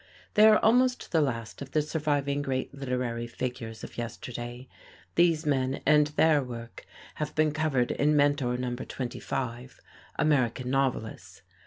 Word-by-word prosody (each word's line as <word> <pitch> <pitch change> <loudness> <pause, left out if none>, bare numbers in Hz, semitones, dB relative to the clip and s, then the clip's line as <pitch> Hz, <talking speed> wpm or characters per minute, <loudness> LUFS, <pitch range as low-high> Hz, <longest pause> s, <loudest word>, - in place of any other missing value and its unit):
They 215 +1 +7
are 215 -1 +7
almost 250 +3 +2
the 160 - +3
last 115 -5 -3
of 140 -1 -8
the 155 - +3
surviving 145 -2 -1
great 135 -1 -2
literary 125 -3 -3
figures 115 -2 -5
of - - -8
yesterday. 120 +1 -6 0.5
These 165 -2 +3
men 135 -2 0
and 150 0 +5
their 150 0 +3
work 120 -2 -8 0.3
have 150 - -3
been 155 0 +3
covered 145 -5 0
in 150 +1 +2
Mentor 145 -4 +2
Number 125 0 -3
25, 125 0 -5 0.4
"American 130 -4 +1
Novelists." 130 -5 -2
135 Hz, 140 wpm, -28 LUFS, 125-150 Hz, 0.5 s, They